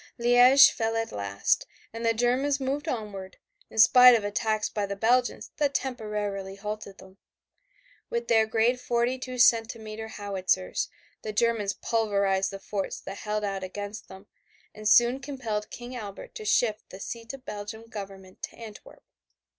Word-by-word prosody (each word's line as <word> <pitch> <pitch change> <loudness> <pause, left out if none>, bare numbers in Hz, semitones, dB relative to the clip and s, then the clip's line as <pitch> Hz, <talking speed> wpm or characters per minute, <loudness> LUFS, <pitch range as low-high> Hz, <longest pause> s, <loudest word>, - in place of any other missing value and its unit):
Liège 245 +3 +7
fell 225 0 -2
at 225 0 -2
last, 100 -1 -1 0.3
and 230 +1 -6
the 230 - +3
Germans 250 +5 +1
moved 275 +3 -2
onward, 205 -7 -5 0.3
in - - -13
spite 250 +2 +8
of 220 - 0
attacks 215 +1 0
by 205 -1 -3
the 200 - -4
Belgians 245 +4 +1
that 290 -2 0
temporarily 210 -6 -3
halted 210 -1 -6
them. 190 +1 -16 0.9
With 235 0 -2
their 220 -1 +4
great 230 +3 +2
42 250 +1 -1
centimeter 225 -2 +2
howitzers 200 - -1 0.3
the 215 - -4
Germans 215 -2 +1
pulverized 200 -4 0
the 195 - -7
forts 195 0 -4
that 195 - -8
held 210 0 -3
out 195 -2 -3
against 205 +3 -6
them 190 +1 -13 0.5
and 215 0 -2
soon 240 +4 +5
compelled 260 -7 -4
King 245 +1 -8
Albert 205 -5 -8
to 215 - -8
shift 215 0 +1
the 190 - -10
seat 230 +2 -6
of 265 - -17
Belgian 210 +2 -7
Government 195 -4 -10
to - - -6
Antwerp. 220 -3 -12
220 Hz, 155 wpm, -27 LUFS, 200-240 Hz, 0.9 s, spite